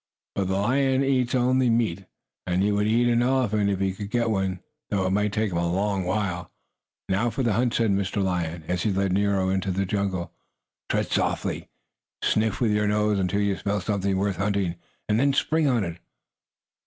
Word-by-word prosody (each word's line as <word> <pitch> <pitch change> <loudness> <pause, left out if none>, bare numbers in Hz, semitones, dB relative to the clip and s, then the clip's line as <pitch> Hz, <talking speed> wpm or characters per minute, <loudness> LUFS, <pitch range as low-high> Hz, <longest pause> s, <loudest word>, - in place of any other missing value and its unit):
But 100 -2 -1
the 95 - 0
lion 130 +5 +2
eats 130 -2 +1
only 130 0 +3
meat, 110 -5 0 0.4
and 90 +1 +1
he 105 - +2
would 105 0 +1
eat 120 +2 +3
an 120 0 +3
elephant 120 -5 +2
if 100 -2 -1
he 95 -1 0
could 100 +1 -7
get 115 0 +1
one, 95 -3 -1 0.3
though 100 -4 0
it 95 - 0
might 105 +1 +1
take 110 -1 0
him 85 - -1
a 85 0 0
long 95 0 0
while. 90 -3 -2 0.6
"Now 100 +5 +1
for 130 +4 -2
the 115 -3 +2
hunt!" 120 +3 +1
said 115 -3 +2
Mr. 100 0 0
Lion, 85 -3 -2
as 90 -1 -1
he 110 - +1
led 95 -1 0
Nero 100 -1 +1
into 95 0 0
the 95 +1 0
jungle. 95 -2 -2 0.6
"Tread - - 0
softly. - - -1 0.5
Sniff 110 -2 +1
with 115 -4 +2
your 105 0 +1
nose 105 -1 +1
until 95 +2 0
you 100 -1 +1
smell 100 +1 -1
something 100 -2 -1
worth 100 0 0
hunting, 100 -3 0 0.3
and 105 +1 +2
then 140 +1 +3
spring 155 +2 +2
on 120 -5 +2
it." 85 -2 -5
100 Hz, 200 wpm, -25 LUFS, 95-115 Hz, 0.6 s, only